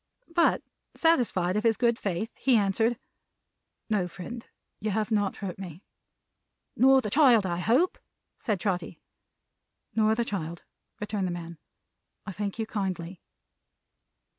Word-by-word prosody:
But, 340 0 +3 0.3
satisfied 235 - +2
of 210 - 0
his 225 -2 +3
good 235 -1 +2
faith, 200 +3 -2
he 260 -2 +3
answered: 220 +3 +2 0.9
"No, 205 -5 +1
friend. 225 +7 -8 0.4
You 215 - -2
have 215 +2 -1
not 205 -2 +1
hurt 190 -3 -5
me." 180 -1 -8 0.9
"Nor 265 +1 +6
the 210 - -4
child, 245 -7 +5
I 175 -2 -1
hope?" 245 - +2 0.4
said 210 -6 -1
Trotty. 180 -2 -2 0.9
"Nor 220 0 +3
the 235 +1 0
child," 170 -5 -4 0.4
returned 205 -2 -2
the - - -2
man. 170 -2 -7 0.7
"I 205 - -5
thank 200 +1 -4
you 225 - -1
kindly." 190 -5 -4
210 Hz, 135 wpm, -28 LUFS, 185-230 Hz, 0.9 s, Nor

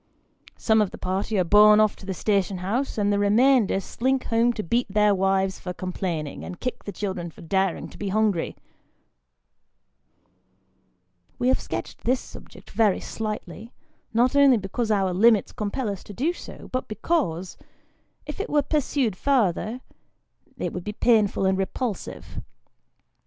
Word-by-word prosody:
Some 220 -1 +3
of 205 - +1
the - - -10
party 190 +3 -2
are 185 - +3
borne 210 +4 +7
off 215 -1 +3
to 195 - -13
the 190 - -3
station 195 -1 0
house, 220 +11 -2
and 205 -1 +2
the 200 - +1
remainder 220 +1 +4
slink 260 +7 -1
home 230 +1 +2
to 215 - -4
beat 235 +8 0
their 210 0 +4
wives 190 0 +1
for 180 - -5
complaining, 175 -5 -4
and 180 - -8
kick 250 - -4
the 205 - -4
children 190 -3 -4
for - - -15
daring 190 +2 -1
to - - -14
be 200 - -3
hungry. 205 -4 0 2.8
We 250 - +1
have 260 - +3
sketched - - -6
this 255 +1 +2
subject - - -13
very 215 -4 +2
slightly, 215 +1 -6 0.4
not 245 +4 +2
only 280 -3 +6
because 215 +3 -3
our 195 -3 +1
limits 215 +2 +4
compel 215 +4 -3
us 200 -3 -4
to 205 - -9
do 295 - 0
so, - - -11
but 255 0 -2
because, 215 - -1 0.7
if - - -7
it 405 - -3
were 295 -1 +2
pursued 275 - 0
farther, 235 -1 0 0.8
it 180 -7 -3
would 180 - -5
be 210 - -5
painful 215 -4 +2
and 190 0 +2
repulsive. 210 +3 -4
210 Hz, 155 wpm, -25 LUFS, 190-240 Hz, 2.8 s, borne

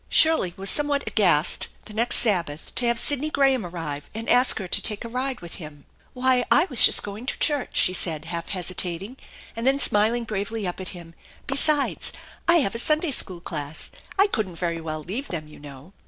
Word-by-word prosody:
Shirley 315 - +3
was 195 +1 -3
somewhat 290 -1 +1
aghast 175 -7 +2 0.2
the 215 - -11
next 230 +3 +3
Sabbath 170 -9 -1
to 245 - 0
have 235 0 +1
Sidney 290 +4 +3
Graham 270 -5 +2
arrive 165 -5 -6
and 225 +1 -6
ask 250 +1 +5
her 190 - -5
to - - +3
take 210 +1 -2
a - - -5
ride 255 +2 -4
with 170 -1 -9
him. 150 -4 -11 0.3
"Why, 255 -1 +2
I - - +5
was 255 - +7
just - - +7
going 205 +5 -8
to 280 - -2
church," 290 -4 -1
she 185 - +4
said, 160 -4 0
half 170 0 -6
hesi 185 -2 -2
tating, 185 +8 -4 0.4
and 230 +2 -3
then 270 +1 +3
smiling 225 -1 +2
bravely 215 0 -4
up 180 0 -5
at 185 - -6
him; 165 -1 -13 0.2
" - - -26
besides, 280 +1 0 0.4
I 340 -1 +5
have 195 - -2
a 230 - -1
Sunday 305 +4 +1
school 185 -8 -1
class. 150 -2 -6 0.3
I 395 - +5
couldn't 215 - -3
very 170 -1 -3
well 155 -1 -5
leave 230 - -5
them, 155 -3 -6
you 150 - -15
know." 145 +4 -13
210 Hz, 210 wpm, -23 LUFS, 170-255 Hz, 0.4 s, was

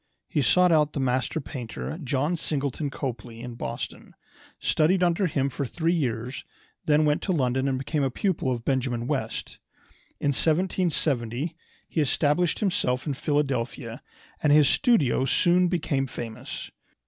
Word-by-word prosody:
He 150 - 0
sought 180 +6 +4
out 150 -2 +3
the - - -2
master 130 +4 0
painter, 110 - -6
John 145 +5 0
Singleton 145 -2 -2
Copley, 120 -4 -5
in 120 0 -6
Boston, 115 - -6 0.4
studied 180 +4 +2
under 175 +2 +2
him 140 -4 0
for 140 +1 -3
three 165 +6 0
years, 125 -5 -2 0.4
then 155 0 +4
went 150 0 +2
to 195 - -1
London 130 -4 +1
and 135 -1 0
became 135 +3 -1
a 135 - +2
pupil 155 -1 -1
of 120 -2 -3
Benjamin 125 -3 0
West. - - -3 0.6
In 145 - +1
1770 155 -4 +1 0.3
he 160 - 0
established 150 - +1
himself 130 -10 +1
in 145 - -1
Philadelphia, 135 -5 -2 0.4
and 150 - +3
his 150 -1 +6
studio 165 - +3
soon 175 +6 +3
became 150 -6 0
famous. 115 -3 -7
140 Hz, 145 wpm, -26 LUFS, 125-160 Hz, 0.6 s, his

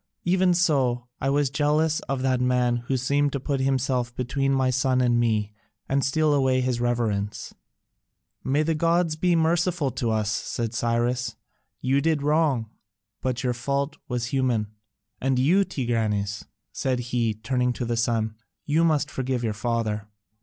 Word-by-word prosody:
Even 180 0 +3
so 135 -8 +2
I 135 - 0
was 140 -1 +1
jealous 150 +2 +2
of 135 -1 -1
that 130 -1 +1
man 125 -1 +2
who 135 - +1
seemed 140 +3 +1
to 140 - -1
put 135 +1 -2
himself 130 -2 0
between 135 +2 -1
my 130 -1 +2
son 130 0 +1
and 120 -1 +3
me 110 -3 0 0.3
and 135 0 +1
steal 155 +2 +2
away 130 -2 +2
his 125 -2 -1
reverence." 110 -4 -1 0.9
"May 145 +3 +1
the 165 +1 +1
gods 165 +1 +1
be 175 +2 +2
merciful 165 -2 +1
to 115 0 -2
us!" 110 -2 0
said 115 +1 -3
Cyrus, 120 +1 0 0.5
"you 135 +2 +2
did 155 -2 +1
wrong, 145 -7 +1 0.5
but 130 0 -2
your 125 -1 +1
fault 140 +4 -2
was 125 -1 -2
human. 120 -6 +1 0.5
And 135 0 +1
you, 170 +10 +4
Tigranes," 110 - -2 0.3
said 130 -1 -1
he, 115 -3 +1
turning 125 +3 0
to 120 - -4
the 120 0 -1
son, 115 -2 0 0.3
"you 155 +3 +2
must 155 -3 +2
forgive 130 -2 -2
your 110 -2 0
father." 110 -2 -2
130 Hz, 160 wpm, -25 LUFS, 120-145 Hz, 0.9 s, you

